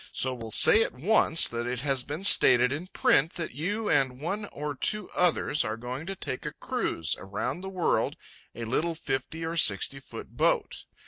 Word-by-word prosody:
So 130 0 -1
will 115 -3 -7
say 165 - +6
at - - 0
once 165 +2 +4
that 120 0 -4
it 125 0 -3
has 135 -2 0
been 150 +8 -6
stated 125 -10 +6
in 155 +6 -4
print 160 -3 +2
that 165 -2 -5
you 205 - -3
and 130 -2 +1
one 200 +8 -3
or 150 -6 -5
two 210 +8 -3
others 170 -4 +1
are 110 +1 -4
going 125 +7 -6
to 195 - -4
take 130 -7 -5
a - - -5
cruize 80 - -2
around 125 - -4
the 190 - -6
world 185 -3 0 0.4
a 115 - -5
little 160 +8 -1
fifty 140 +3 -4
or 165 +1 -4
sixty 120 +2 +1
foot 135 - -10
boat. - - 0
145 Hz, 190 wpm, -27 LUFS, 125-170 Hz, 0.4 s, say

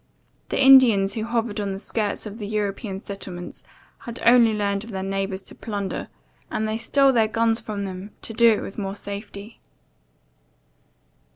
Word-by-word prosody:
The - - -1
Indians 255 -8 +7
who 220 -1 -3
hovered 230 -2 -1
on 200 -1 -2
the 190 - -6
skirts 210 0 -2
of 210 +2 -8
the 205 - -5
European 205 -1 -3
settlements 190 -3 -7 0.4
had 235 -1 -8
only 235 -1 +6
learned 200 -1 -1
of 230 - -11
their 190 -3 -4
neighbours 195 0 -3
to - - -9
plunder, 205 -3 -4 0.4
and 220 - -2
they 215 - -1
stole 275 +4 +3
their 225 -3 +3
guns 225 +1 +1
from 205 -2 -4
them 190 +1 -7
to 225 - -6
do 235 +1 +6
it 210 - -2
with 195 - -7
more 195 -1 -3
safety. 205 +1 -8
210 Hz, 170 wpm, -23 LUFS, 195-230 Hz, 0.4 s, Indians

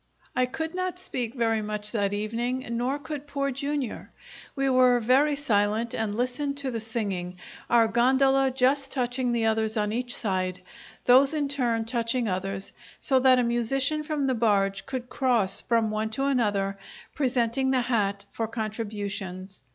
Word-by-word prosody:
I 255 0 +2
could 320 +6 -4
not 370 0 -2
speak 250 -9 -4
much 215 -3 -1
that 205 -4 0
evening, 235 +5 -2
nor 245 +4 0
could 290 -1 -7
Poor 275 -1 -1
Jr. 280 -1 -3 0.5
We 275 -1 0
were 255 -2 +5
very 270 +6 +3
silent 225 -4 0
and 215 -2 -2
listened 255 +4 -1
to 275 -2 -3
the 230 - -3
singing, 200 -5 -3 0.3
our 230 -1 +5
gondola 265 +4 +3
just 270 +2 +1
touching 250 -1 -1
the 235 -1 +1
others 220 0 +1
on 210 -1 0
each 245 +2 -2
side, 185 -3 -2 0.4
those 270 +4 +6
in 290 -2 0
turn 240 -5 0
touching 235 0 -1
others, 195 0 -3 0.3
so 265 -2 +2
that 255 0 +6
a 250 - +3
musician 260 +6 0
from 300 -2 -2
the 265 - +2
barge 200 -4 +1
could 255 -2 -4
cross 245 -8 +1
from 230 -2 +1
one 215 +1 -1
to 270 - 0
another, 205 -7 0 0.3
presenting 255 -1 +1
the 260 -1 +3
hat 200 -5 0
for 225 - -2
contributions. 205 -4 -5
240 Hz, 160 wpm, -27 LUFS, 215-265 Hz, 0.5 s, those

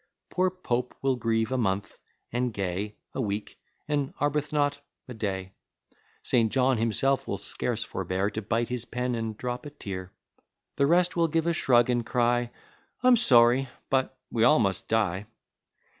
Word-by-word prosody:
Poor 185 +1 +2
Pope 125 -9 -3
will 135 -1 +2
grieve 115 -1 0
a 130 - 0
month, 100 -3 -1 0.3
and 125 +1 0
Gay 100 +1 -3 0.2
A - - -2
week, 105 -2 -4 0.3
and 145 -2 -1
Arbuthnot 145 0 0 0.3
a 125 - -7
day. 95 -4 -3 0.7
St. 115 -3 +2
John 130 -2 +2
himself 125 +4 +1
will - - -2
scarce - - -3
forbear 95 +3 -2
To 110 - -4
bite 115 +3 -1
his 125 -2 -2
pen, 125 +1 -2
and 115 -2 -3
drop 125 +2 -4
a - - -6
tear. 95 -10 -7 0.7
The 140 - +3
rest 175 +2 +3
will 170 -1 +3
give 165 0 0
a 170 - +2
shrug, 120 -6 +4
and 120 -1 +1
cry, 120 +1 +1 0.5
"I'm 250 -1 +7
sorry 125 - +5 0.2
but 130 0 +1
we 115 - +1
all 150 +6 +6
must 100 -5 0
die!" 105 -3 0
120 Hz, 160 wpm, -27 LUFS, 110-135 Hz, 0.7 s, I'm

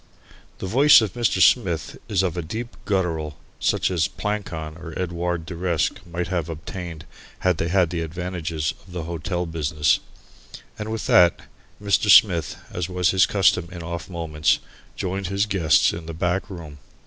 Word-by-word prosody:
The - - -6
voice 140 +10 +7
of 105 -5 -2
Mr. 120 -2 +1
Smith 90 -10 +3
is 95 -2 +2
of 90 -3 -1
a 90 - -2
deep 110 +9 -6
guttural 80 -7 -1 0.2
such - - +1
as 85 -1 +1
Plancon 95 -7 -4
or 80 -1 -8
Edouard 85 -2 -2
de 90 - -7
Reske 85 -1 -1
might 85 0 -3
have 85 -3 -2
obtained 80 0 -7 0.4
had 90 -3 +2
they 80 - -1
had 90 -1 +2
the 85 -2 -2
advantages 85 -2 -3
of 90 - -13
the 90 -2 -4
hotel 85 +2 -3
business. 75 -2 +1 0.8
And 105 +1 -4
with 110 - -3
that, 90 -1 +5 0.4
Mr. 105 0 +1
Smith, 90 -6 +6 0.2
as 90 0 -3
was 90 -2 +2
his 95 -2 +4
custom 90 -3 +2
in 85 -2 -7
off 85 +1 -6
moments, 80 -3 +1 0.4
joined 95 0 -3
his 100 +2 +1
guests 90 -8 +3
in 85 -1 -7
the 85 - -6
back 90 +4 -1
room. 80 -6 -9
90 Hz, 170 wpm, -23 LUFS, 80-95 Hz, 0.8 s, voice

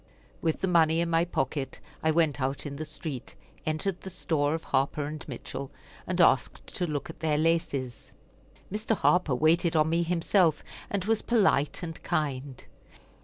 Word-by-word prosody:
With 160 -1 0
the 190 - +1
money 165 -2 +4
in 170 0 0
my 165 +1 +3
pocket 135 -4 -2 0.2
I 160 - +2
went 155 -4 +2
out 135 +3 -2
in 140 -1 -5
the 155 - -4
street, 140 -5 -7 0.3
entered 170 +4 -1
the 190 - -7
store 155 -4 0
of 160 - -5
Harper 145 +2 0
& - - -11
Mitchell, 135 0 -6 0.4
and - - -1
asked - - +3
to 180 - -1
look 150 0 -3
at - - -18
their 155 -2 +1
laces. 145 -7 -1 0.6
Mr. 215 +2 0
Harper 180 -9 +3
waited 165 +4 +3
on 155 0 +3
me 170 +1 +2
himself, 170 -1 +2 0.3
and 195 -2 -2
was 225 0 +2
polite 195 - +2
and 165 -1 -6
kind. 140 -3 -2
160 Hz, 170 wpm, -28 LUFS, 145-170 Hz, 0.6 s, money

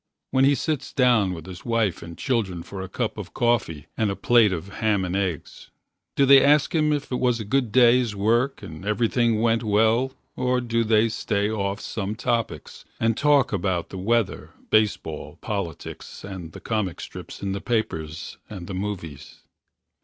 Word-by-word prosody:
When 130 0 +4
he 140 +1 +4
sits 155 -1 -2
down 120 -7 +3
with 80 -3 -7
his 90 -3 -9
wife 115 -6 0
and 85 0 -9
Children 100 -10 -1
for 95 +2 -7
a 95 - -6
cup 110 +1 -3
of 100 - -8
coffee 120 - 0
and 110 -2 +1
a 100 - -2
Plate 115 -3 +4
of 90 0 -4
ham 105 -4 +1
and 90 +1 -3
eggs, 95 -6 -3 0.5
do 140 - +4
they 135 0 +8
ask 145 0 +4
Him 155 -2 +2
if 145 -2 -2
it 125 - -1
was 125 -2 +2
a 110 - -5
good 125 +1 0
day's 120 -1 +4
work 115 +5 +1
And 80 -3 -9
everything 115 +1 +1
went 115 -1 +3
well 115 +4 +2 0.2
or 125 0 +1
do 115 -1 0
they 110 0 +3
Stay 105 -1 -1
off 100 -2 -2
some 105 -1 -4
topics 115 -1 -3 0.2
and 115 0 +2
kill 145 -2 +4
about 95 -3 -1
The 95 - -7
weather, 115 +2 0 0.2
baseball, 110 -1 0
politics - - -6
And 90 -5 -8
the - - -9
comic 105 -6 -2
strips - - -9
in 100 - -1
the 95 0 -3
papers 80 -9 -3
And 95 -5 -7
the 95 - -6
movies? 90 -7 -6
110 Hz, 180 wpm, -24 LUFS, 95-120 Hz, 0.5 s, they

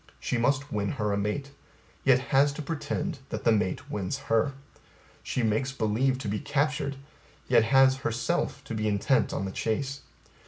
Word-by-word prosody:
She 125 - -1
must 140 +3 +1
win 100 -1 -1
her 105 -1 -1
a - - 0
mate, 135 +8 -2 0.5
yet 130 -2 +6 0.2
has 140 +2 +5
to 150 - -6
pretend 165 +1 -3
that - - -4
the 115 - +4
mate 105 -4 0
wins 95 -3 -2
her. 115 +5 +2 0.7
She 125 - -2
makes 110 +4 +1
believe 130 +2 +1
to - - -1
be 105 +1 -1
captured, 145 -1 0 0.5
yet 110 - +5
has 135 +2 +5
herself 115 -3 -1
to - - -6
be 110 -1 -1
intent 105 +5 +2
on 95 - -2
the 95 - -3
chase. 135 +7 -2
130 Hz, 170 wpm, -28 LUFS, 105-140 Hz, 0.7 s, yet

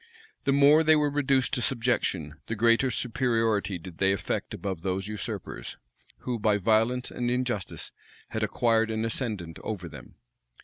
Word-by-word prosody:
The 140 - +3
more 145 +3 +6
they 155 0 +6
were 150 -1 +2
reduced 135 -2 +1
to 125 - +1
subjection, 105 - -1
the 115 - -2
greater 115 +4 +3
superiority 115 -5 0
did 85 0 -11
they 95 0 +3
affect 100 - -3
above 95 -4 -4
those 95 +2 -2
usurpers, 95 - -5 0.4
who, 125 -2 -3
by 105 -1 +3
violence 115 +5 +1
and 120 0 -2
injustice, 125 -5 -2 0.4
had - - -3
acquired 115 -1 +2
an 110 0 -1
ascendant 105 -8 -3
over 95 -5 -5
them. 75 -5 -12
115 Hz, 150 wpm, -27 LUFS, 95-125 Hz, 0.4 s, more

